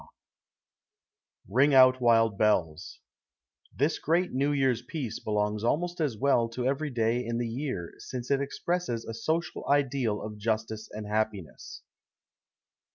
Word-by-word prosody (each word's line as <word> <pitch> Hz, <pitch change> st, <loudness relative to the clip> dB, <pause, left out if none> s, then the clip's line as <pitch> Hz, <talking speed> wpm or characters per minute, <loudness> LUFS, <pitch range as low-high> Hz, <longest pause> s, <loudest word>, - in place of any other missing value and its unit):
_ -, -, -15 dB, 1.4 s
RING 135 Hz, +8 st, +3 dB
OUT, 130 Hz, -1 st, +6 dB
WILD 115 Hz, -3 st, +4 dB
BELLS 90 Hz, -7 st, 0 dB, 0.7 s
This 145 Hz, +5 st, 0 dB
great 175 Hz, +3 st, +1 dB
New 140 Hz, +3 st, +1 dB
Year's 135 Hz, -5 st, +1 dB
piece 125 Hz, -3 st, -5 dB
belongs 105 Hz, 0 st, -1 dB
almost 175 Hz, +8 st, 0 dB
as 135 Hz, -8 st, -1 dB
well 120 Hz, -2 st, +2 dB
to 125 Hz, +2 st, -4 dB
every 140 Hz, +3 st, 0 dB
day 120 Hz, -1 st, 0 dB
in 115 Hz, 0 st, -3 dB
the 120 Hz, 0 st, -1 dB
year, 120 Hz, -, -4 dB
since 125 Hz, +1 st, -6 dB
it 140 Hz, 0 st, +2 dB
expresses 140 Hz, -3 st, -2 dB
a 115 Hz, -, -6 dB
social 160 Hz, +9 st, -2 dB
ideal 135 Hz, -6 st, +1 dB
of 105 Hz, -1 st, -7 dB
justice 110 Hz, 0 st, -2 dB
and 105 Hz, 0 st, -6 dB
happiness. 105 Hz, -4 st, -4 dB
120 Hz, 140 wpm, -28 LUFS, 110-140 Hz, 1.4 s, OUT